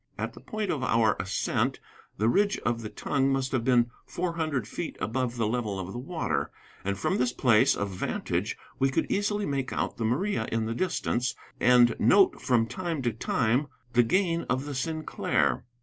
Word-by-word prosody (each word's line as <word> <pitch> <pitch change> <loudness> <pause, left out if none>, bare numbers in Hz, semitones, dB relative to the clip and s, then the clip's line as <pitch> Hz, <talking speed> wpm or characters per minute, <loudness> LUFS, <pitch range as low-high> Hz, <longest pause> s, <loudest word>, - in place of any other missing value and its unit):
At - - -3
the - - -12
point 215 -3 -3
of 150 -6 -2
our 115 -4 +3
ascent 95 +2 0 0.4
the 110 - +2
ridge 200 - +3
of 120 -1 0
the 110 - -5
tongue 135 +3 0
must 135 -1 0
have 130 -3 0
been 120 -1 +3 0.2
four 175 -1 -2
hundred 155 -9 -1
feet - - -5
above 125 +2 -2
the 115 - +1
level 110 -3 -1
of 95 +1 -5
the 120 - -4
water, 125 - -2 0.3
and 100 0 -1
from 100 - 0
this 125 -1 +2
place 120 -4 +4
of 100 -1 -2
vantage 90 - -2 0.2
we 135 - +3
could 135 - 0
easily 205 0 0
make 135 -4 -2
out - - -2
the 115 - -2
Maria 180 - 0
in 115 -1 0
the 115 - -2
distance, 125 -5 -1 0.2
and 120 -2 +5
note 200 0 +5
from 120 -3 +3
time 170 +1 -3
to 120 -2 0
time 115 +5 +1 0.3
the 120 - +6
gain 170 - +1
of 130 +2 0
the 145 - -5
Sinclair. 135 - 0
125 Hz, 190 wpm, -28 LUFS, 115-155 Hz, 0.4 s, the